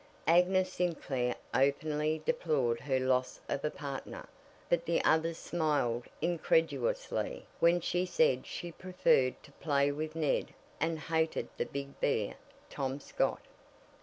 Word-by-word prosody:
Agnes 185 +3 +4
Sinclair 135 -8 -1 0.2
openly 150 +3 +1
deplored 145 - +1
her 135 -2 0
loss 130 0 +1
of 140 - -2
a 150 - +1
partner, 140 -2 -6 0.4
but 170 -1 +2
the 170 - +2
others 160 +1 +2
smiled 145 -10 0 0.2
incredulously - - 0
when 170 +1 +5
she 175 +1 0
said 480 - +2
she 175 -2 -5
preferred 175 -8 +2
to 140 - -15
play 140 -2 +2
with 155 +2 -4
Ned 155 -3 0 0.2
and 165 +1 0
"hated 160 +1 -1
that - - -2
big 140 0 -6
bear, 110 -7 +1 0.3
Tom 135 +1 -3
Scott." - - -1
155 Hz, 130 wpm, -32 LUFS, 140-175 Hz, 0.4 s, when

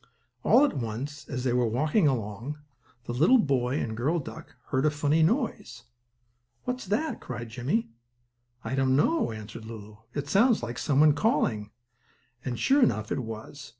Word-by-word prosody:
All 290 - +6
at - - -2
once, 130 +4 -5
as 125 -4 -3
they 125 -2 +1
were 125 -1 +2
walking 150 - +2
along, 120 +2 -2 0.5
the 120 - -5
little 165 - +5
boy 135 - +1
and 110 -1 -3
girl 140 +9 0
duck 145 - -8
heard 130 -1 +1
a - - +5
funny 150 +2 +1
noise. 165 - 0 0.8
"What's 250 -4 -4
that?" 230 +11 -1
cried 120 -2 -6
Jimmie. 125 - -1 0.7
"I 115 - -4
don't 135 -1 +2
know," 320 - +2
answered 110 +1 -8
Lulu. 110 -2 -10 0.2
"It 145 -1 -3
sounds 215 - +3
like 120 0 -4
some 145 -1 +2
one 155 -1 +6
calling." 125 - +1 0.7
And, 125 -2 -3
sure 280 +2 +4
enough, 110 - +2
it - - 0
was. 120 +5 -7
135 Hz, 165 wpm, -27 LUFS, 115-155 Hz, 0.8 s, All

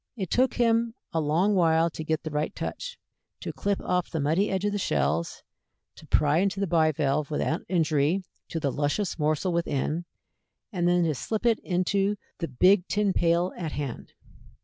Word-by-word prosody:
It 190 -5 -4
took 255 +1 +2
him 230 -1 +2 0.2
a 165 - +1
long 165 +8 +2
while 165 -2 +3
to 160 - -6
get 160 0 -1
the 155 - -5
right 150 +1 -2
touch, - - -5 0.4
to - - -5
clip 200 -1 -1
off 180 -1 -1
the 160 - -3
muddy 160 +8 +1
edge 190 +1 -1
of 205 - +1
the 205 - -2
shells, 75 - -1 0.5
to - - -15
pry 150 +2 +3
into 195 +1 0
the 200 - +1
bivalve 155 -4 +1
without 155 +2 -1
injury 165 0 +1 0.3
to 165 - -3
the 140 -3 0
luscious 150 +7 -1
morsel 155 +4 +1
within, 170 0 -1 0.7
and 175 -2 +1
then 175 0 +3
to 160 -2 +1
slip 215 - -3
it 230 -2 +3
into 195 +3 0 0.2
the 165 - -2
big 180 +8 +4
tin 200 +2 +1
pail 170 +1 +2
at 160 -4 -5
hand. 140 -5 -5
170 Hz, 180 wpm, -27 LUFS, 155-195 Hz, 0.7 s, big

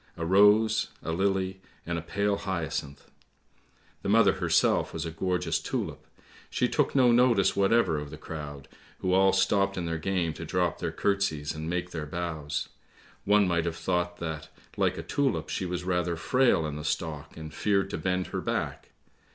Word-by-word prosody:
A 85 - -3
rose, 105 +4 +5 0.2
a 80 - -2
lily, 95 +1 0 0.2
and 85 0 -2
a - - -6
pale 100 +4 0
hyacinth. 80 -7 -4 0.9
The - - -3
mother - - +5
herself - - +2
was - - -3
a 80 - -4
gorgeous 90 -1 -1
tulip, - - -4 0.4
she - - +1
took - - 0
no 125 -3 +6
notice 115 -6 +4
whatever 100 -5 +3
of 75 0 -7
the 75 - -9
crowd, 75 -4 -7 0.3
who 90 - +1
all 95 +1 +5
stopped 100 0 +2
in 90 - -2
their 80 -1 -2
game 90 -2 -1
to 85 - -8
drop 90 +1 0
their - - -2
curtseys 100 -7 0
and 80 +1 -5
make 90 0 -2
their 80 -3 -4
bows; 80 -3 -3 0.6
one 105 -1 +4
might 85 -2 +1
have 85 -1 -3
thought 90 -1 -1
that, 80 -2 -5 0.3
like - - +1
a - - -5
tulip, 140 -4 0
she 95 - -2
was 90 0 -3
rather 90 -1 0
frail 125 -1 +2
in 75 -1 -4
the 75 - -6
stalk 75 -1 -3
and 80 -1 -8
feared 100 0 +1
to - - -3
bend 90 -1 0
her - - -1
back. - - -3
90 Hz, 180 wpm, -28 LUFS, 80-95 Hz, 0.9 s, no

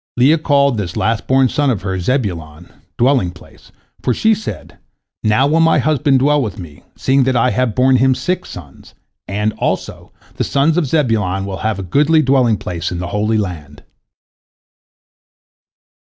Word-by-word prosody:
Leah 145 +6 +4
called 140 -5 +2
this 90 -4 -4
last 115 0 -1
born 130 0 +3
son 145 +3 0
of 110 -8 -2
hers 95 -3 -3
Zebulon, 90 - -3 0.2
"dwelling 125 -6 +2
place," 85 0 -17 0.3
for 125 - 0
she 220 0 +3
said, 215 +1 -7 0.4
"Now 110 +5 +3
will 155 +3 +2
my 165 -1 +4
husband 145 -1 +2
dwell 145 +2 +2
with 110 -3 -4
me, 80 -6 -11 0.2
seeing 135 0 +2
that 130 0 0
I 120 +1 +2
have 125 -4 -1
borne 130 0 +3
him 130 +1 +3
six 180 +9 -3
sons, - - -12 0.3
and, 105 +2 -1
also, - - -3 0.3
the - - 0
sons 145 +3 +1
of 170 -4 0
Zebulon 110 - 0
will 95 -1 -5
have 110 -1 -2
a 95 - -5
goodly 150 - +2
dwelling 125 -5 +2
place 90 -1 -5
in 90 - -4
the 90 0 -5
Holy 105 +2 0
Land." 80 -8 -6
125 Hz, 165 wpm, -16 LUFS, 95-140 Hz, 0.4 s, Leah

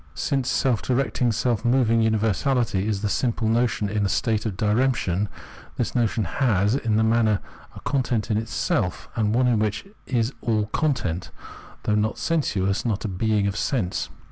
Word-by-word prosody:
Since 135 -2 -1
self 125 -5 +1
directing, 125 -1 0
self 115 0 0
moving 120 -2 +3
universahty 110 0 +1
is 105 -2 -1
the - - +2
simple 115 +1 0
notion 115 -2 +1
in 105 +1 -1
a 100 - +1
state 110 0 0
of 95 -4 -5
diremption, 105 -3 +1 0.5
this - - -1
notion 115 -2 +1
has 105 0 +1
in 115 -5 0
this 110 +1 +3
manner 110 -2 +3 0.4
a - - -8
content 125 -5 -1
in 105 - +2
itself, 110 -3 -2
and 110 -1 +1
one 125 -3 +3
which 105 - -1 0.2
is 120 0 0
all 110 -3 +1
content, 105 - -1 0.5
though 105 - +1
not 105 +1 +1
sensuous, 105 - 0
not 110 -2 -1
a - - 0
being 105 +2 0
of 100 -1 -1
sense. 110 -6 -1
110 Hz, 165 wpm, -24 LUFS, 105-120 Hz, 0.5 s, moving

